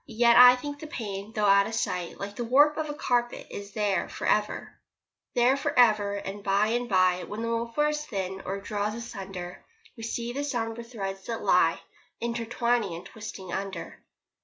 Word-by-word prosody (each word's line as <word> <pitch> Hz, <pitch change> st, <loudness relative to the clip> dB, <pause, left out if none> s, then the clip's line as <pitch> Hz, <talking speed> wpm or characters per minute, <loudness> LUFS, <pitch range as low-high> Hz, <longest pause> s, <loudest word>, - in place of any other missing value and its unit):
Yet 235 Hz, +1 st, +4 dB
I 250 Hz, 0 st, +10 dB
think 290 Hz, +3 st, -6 dB
the 310 Hz, -, -7 dB
pain 205 Hz, -6 st, -5 dB
though 215 Hz, -2 st, 0 dB
out 200 Hz, 0 st, +5 dB
of 225 Hz, -, -4 dB
sight, 180 Hz, -5 st, -2 dB
Like 200 Hz, +1 st, -6 dB
the 240 Hz, -, -3 dB
warp 290 Hz, +5 st, +5 dB
of 315 Hz, -1 st, -2 dB
the 295 Hz, -, -5 dB
carpet, 240 Hz, -4 st, -1 dB
is 200 Hz, 0 st, -8 dB
there 205 Hz, -3 st, 0 dB
for -, -, -6 dB
ever. 210 Hz, 0 st, 0 dB, 0.6 s
There 245 Hz, +2 st, +4 dB
for 285 Hz, 0 st, -2 dB
ever, 210 Hz, -4 st, +4 dB
and 200 Hz, 0 st, -6 dB
by 200 Hz, +2 st, +2 dB
and 240 Hz, +1 st, -1 dB
by 185 Hz, -2 st, +3 dB
When 215 Hz, +2 st, -5 dB
the 230 Hz, -, -2 dB
woof 230 Hz, +1 st, -3 dB
wears 300 Hz, 0 st, +1 dB
thin, 190 Hz, -7 st, -4 dB
or 195 Hz, +1 st, -3 dB
draws 210 Hz, +1 st, -2 dB
asunder, 195 Hz, -6 st, -7 dB, 0.3 s
We 230 Hz, -, -11 dB
see 235 Hz, +1 st, -3 dB
the 285 Hz, +2 st, -2 dB
sombre 235 Hz, -4 st, -3 dB
threads 195 Hz, -5 st, -6 dB
that 230 Hz, -1 st, -4 dB
lie -, -, +3 dB, 0.4 s
Intertwining 235 Hz, -3 st, -1 dB
and 170 Hz, -, -9 dB
twisting 205 Hz, -5 st, -8 dB
under. 195 Hz, -3 st, -5 dB
225 Hz, 185 wpm, -27 LUFS, 200-240 Hz, 0.6 s, I